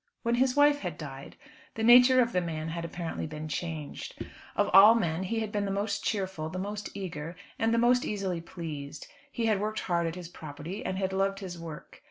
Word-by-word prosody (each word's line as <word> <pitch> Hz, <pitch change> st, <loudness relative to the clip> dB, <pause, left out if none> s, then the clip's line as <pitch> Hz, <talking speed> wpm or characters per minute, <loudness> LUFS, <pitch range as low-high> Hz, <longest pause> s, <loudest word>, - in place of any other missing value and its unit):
When 235 Hz, 0 st, +1 dB
his 255 Hz, +1 st, +2 dB
wife 290 Hz, 0 st, +5 dB
had 180 Hz, -7 st, -5 dB
died, 140 Hz, -3 st, -8 dB, 0.4 s
the 220 Hz, -, -2 dB
nature 250 Hz, +2 st, +8 dB
of 240 Hz, -1 st, +1 dB
the 180 Hz, -, +2 dB
man 160 Hz, -2 st, -4 dB
had 170 Hz, +1 st, -4 dB
apparently 170 Hz, -1 st, -4 dB
been 155 Hz, 0 st, -6 dB
changed. 155 Hz, -1 st, -5 dB, 0.4 s
Of -, -, +2 dB
all 205 Hz, +4 st, +9 dB
men 170 Hz, -6 st, 0 dB
he 225 Hz, +4 st, -1 dB
had 215 Hz, -1 st, -3 dB
been 205 Hz, -1 st, -1 dB
the -, -, -2 dB
most 200 Hz, +1 st, -1 dB
cheerful, 190 Hz, -6 st, -2 dB
the 180 Hz, -, -6 dB
most 205 Hz, +2 st, -4 dB
eager, 170 Hz, -4 st, -5 dB, 0.2 s
and 225 Hz, 0 st, +2 dB
the 230 Hz, -, +2 dB
most 245 Hz, +1 st, +4 dB
easily 190 Hz, -5 st, -2 dB
pleased. 155 Hz, -4 st, -7 dB, 0.3 s
He 235 Hz, -, -2 dB
had 215 Hz, -3 st, +2 dB
worked 215 Hz, +1 st, -2 dB
hard 170 Hz, -2 st, 0 dB
at 165 Hz, -, -4 dB
his 180 Hz, -2 st, -7 dB
property, 160 Hz, +3 st, -7 dB
and 185 Hz, -, -2 dB
had 190 Hz, -1 st, -1 dB
loved 195 Hz, +1 st, +1 dB
his 185 Hz, -3 st, -7 dB
work. 165 Hz, -2 st, -9 dB
190 Hz, 215 wpm, -29 LUFS, 165-215 Hz, 0.4 s, all